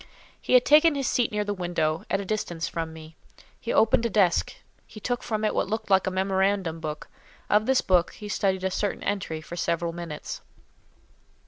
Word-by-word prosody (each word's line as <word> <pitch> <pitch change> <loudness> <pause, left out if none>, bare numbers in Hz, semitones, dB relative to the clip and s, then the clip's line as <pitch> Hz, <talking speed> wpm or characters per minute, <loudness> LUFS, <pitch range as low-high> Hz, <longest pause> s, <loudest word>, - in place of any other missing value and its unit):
He - - -1
had 250 -1 +6
taken 305 +1 +6
his 275 -2 -1
seat 240 -2 +1
near 210 0 0
the 205 0 -2
window, 175 -4 -1
at 195 - +1
a 200 - -4
distance 175 -5 -2
from 165 -1 -4
me; 160 0 -12 0.4
he 235 - -4
opened 225 +1 +4
a 235 - +1
desk; 195 -4 +2 0.3
he 215 - -11
took 245 +3 -2
from 215 -2 -2
it 215 - +1
what - - 0
looked 220 0 -3
like 190 -1 +4
a - - +3
memorandum 190 -2 0
book; 150 -1 -5 0.4
of 210 +1 +3
this 265 0 +4
book 180 -2 +2
he 210 - -9
studied 190 -2 0
a 190 - 0
certain 205 +2 -2
entry 185 -6 -2
for 170 - -8
several 170 0 -1
minutes. 170 -3 -6
190 Hz, 200 wpm, -26 LUFS, 170-215 Hz, 0.4 s, had